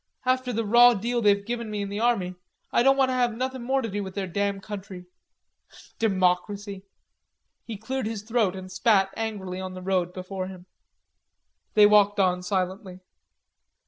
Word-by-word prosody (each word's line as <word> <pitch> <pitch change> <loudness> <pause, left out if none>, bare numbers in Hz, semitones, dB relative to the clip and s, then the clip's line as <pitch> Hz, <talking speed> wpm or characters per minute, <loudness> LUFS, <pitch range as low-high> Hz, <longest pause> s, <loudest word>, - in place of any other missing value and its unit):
After 255 0 +1
the 230 -1 -2
raw 240 +3 +6
deal 235 +4 -1
they've 200 -2 +3
given 235 -1 -4
me 210 -1 -3
in 200 - -5
the 205 +1 -4
army, 220 -6 +1 0.4
I - - +3
don't 270 +2 +4
want 265 -1 +3
to - - 0
have 245 -3 0
nothin' 260 0 -3
more 265 +2 0
to - - -2
do 205 -1 -3
with 190 -1 -8
their 200 -2 -2
damn 200 +2 -2
country. 195 -3 -8 0.9
Democracy!" 195 0 0 0.8
He 225 -3 -6
cleared 240 +3 -3
his 220 -2 -5
throat 220 -4 0
and 185 0 -8
spat 195 -2 +2
angrily 195 -5 -4
on 185 0 -6
the 185 - -8
road 180 -2 0
before 185 +1 -5
him. 185 -1 -11 1.1
They 210 -1 +8
walked 205 -1 +4
on 180 -2 +2
silently. 185 0 -3
205 Hz, 175 wpm, -25 LUFS, 190-230 Hz, 1.1 s, They